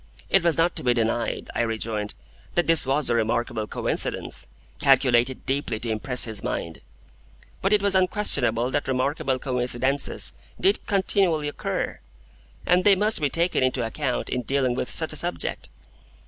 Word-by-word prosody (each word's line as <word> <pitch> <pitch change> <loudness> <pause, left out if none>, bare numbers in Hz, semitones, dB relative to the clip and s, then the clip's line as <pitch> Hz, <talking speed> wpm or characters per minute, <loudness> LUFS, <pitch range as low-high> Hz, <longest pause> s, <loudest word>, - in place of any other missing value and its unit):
It 195 - +4
was 170 -3 +2
not 170 +1 +2
to - - -5
be 125 -1 +2
denied, 115 0 -2
I - - 0
rejoined, 110 -2 -3 0.4
that 175 - +2
this 165 -5 +5
was 140 +1 +1
a - - +2
remarkable 115 -1 -1
coincidence, - - -2 0.3
calculated 130 -2 +3
deeply 135 -5 -2
to 115 0 -3
impress 125 +3 +2
his 110 -3 -2
mind. 85 -1 -4 0.8
But 195 - 0
it 210 -1 +3
was 200 -1 +3
unquestionable 140 - +2
that 145 0 -1
remarkable 130 0 0
coincidences 130 +2 0 0.3
did 390 +2 +2
continually 190 -6 +1
occur, 145 - -3 0.7
and 180 +1 +3
they 200 0 +6
must 210 -1 0
be 145 - +1
taken 170 +2 +1
into 130 -2 0
account 120 +2 -3
in 125 - -1
dealing 130 0 0
with - - -3
such - - +1
a - - -2
subject. - - -2
130 Hz, 160 wpm, -24 LUFS, 120-170 Hz, 0.8 s, they